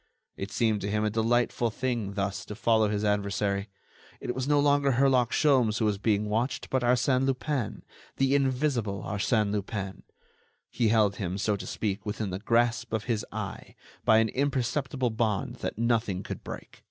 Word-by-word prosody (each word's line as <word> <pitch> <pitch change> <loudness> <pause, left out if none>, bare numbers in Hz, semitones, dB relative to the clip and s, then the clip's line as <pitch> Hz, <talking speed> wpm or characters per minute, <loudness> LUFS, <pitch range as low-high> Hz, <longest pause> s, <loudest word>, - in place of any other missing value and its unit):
It 95 - -5
seemed 110 +1 +1
to 100 - -2
him 105 +1 0
a 105 - 0
delightful 120 +2 +1
thing 115 -4 -2
thus 100 -2 -2
to 105 - -7
follow 110 -1 +3
his 105 0 -1
adversary. 100 0 0 0.5
It 125 - -3
was 130 +1 -3
no 145 0 +4
longer 145 -1 +3
Herlock 130 -2 +3
Sholmes 130 -9 +3
who 115 - +1
was 105 -2 0
being 105 -1 +1
watched, 115 +5 -1
but 130 - +2
Arsène 125 +2 +2
Lupin, 135 -2 -2 0.3
the 135 0 +2
invisible 130 -7 0
Arsène 105 +1 0
Lupin. 100 -1 -4 0.7
He 115 - +1
held 105 -2 +3
him, 95 -1 -3
so 105 +1 +1
to 100 - -7
speak, 100 -3 -2
within 105 -1 -3
the 95 - -3
grasp 115 +2 +1
of 110 -1 0
his 110 -2 -1
eye, - - -6 0.3
by 110 - +5
an 110 0 +3
imperceptible 130 -1 -1
bond 110 -3 -1
that - - -4
nothing 115 -5 0
could - - -6
break. - - -9
110 Hz, 175 wpm, -28 LUFS, 105-125 Hz, 0.7 s, by